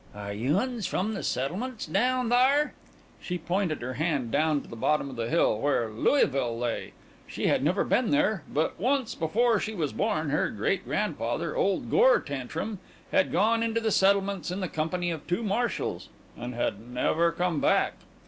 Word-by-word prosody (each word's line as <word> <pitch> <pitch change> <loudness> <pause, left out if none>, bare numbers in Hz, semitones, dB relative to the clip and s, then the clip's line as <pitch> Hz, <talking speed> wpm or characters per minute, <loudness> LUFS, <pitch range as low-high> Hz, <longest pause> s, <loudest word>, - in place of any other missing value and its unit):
"Are 100 0 -5
you 125 - +1
uns 235 -3 -1
from 210 +4 -1
the 200 - -4
settlements 210 - -2
down 245 +8 +1
thar?" 270 +5 +4 0.5
She 180 - -3
pointed 175 -3 -1
her 130 +1 -3
hand 145 -6 -1
down 150 +1 +2
to - - -15
the - - -9
bottom 140 +4 0
of - - -8
the 115 -1 -3
hill, 160 -9 +2
where 120 -4 0
Louisville 125 - +1
lay. 120 -1 -3 0.3
She - - -4
had - - +2
never 180 +7 +2
been 245 -3 +1
there; 290 - +2
but 155 +2 -1
once, 260 +3 +1
before 220 +7 +2
she 220 0 -4
was 155 -6 -2
born, 160 -9 0
her 150 - +1
great - - -1
grandfather, - - -2
old 485 -1 0
Gore - - +6
Tantrum, 145 - -5 0.3
had 190 - +2
gone 225 +5 +2
into 230 0 0
the 225 -1 0
settlements 195 -1 +2
in 180 +2 -3
the 185 - -2
company 175 +3 -2
of 160 -3 -6
two 175 +6 -1
marshals, 225 +3 -2 0.3
and 120 0 -6
had 110 -4 -1
never 125 +8 +1
come 175 -3 -1
back. - - +3
175 Hz, 180 wpm, -27 LUFS, 140-225 Hz, 0.5 s, Gore